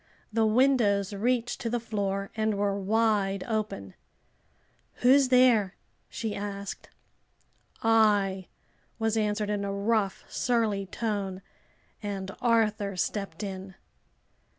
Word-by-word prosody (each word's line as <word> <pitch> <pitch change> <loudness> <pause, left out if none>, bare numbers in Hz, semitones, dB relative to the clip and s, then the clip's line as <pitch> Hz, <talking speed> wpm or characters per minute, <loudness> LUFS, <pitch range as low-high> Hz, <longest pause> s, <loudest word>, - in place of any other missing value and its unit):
The 225 0 +3
windows 215 -5 +3
reached 240 +3 0
to 230 - -2
the 240 +1 0
floor 200 -3 -3
and 220 -1 0
were 200 -1 +1
wide 200 -1 +1
open. 210 - -3 1.1
"Who's 270 +1 +6
there?" 245 -7 +4 0.3
she 220 -2 -4
asked. 200 -1 -6 0.9
"I," 205 -4 +3 0.5
was 225 -1 0
answered, 210 -1 0
in 205 -1 -1
a 200 - -2
rough, 200 0 0
surly 220 -5 0
tone, 195 -3 -3 0.6
and 195 -2 -4
Arthur 215 -4 +1
stepped 195 -1 -3
in. 190 -1 -6
210 Hz, 105 wpm, -28 LUFS, 195-225 Hz, 1.1 s, Who's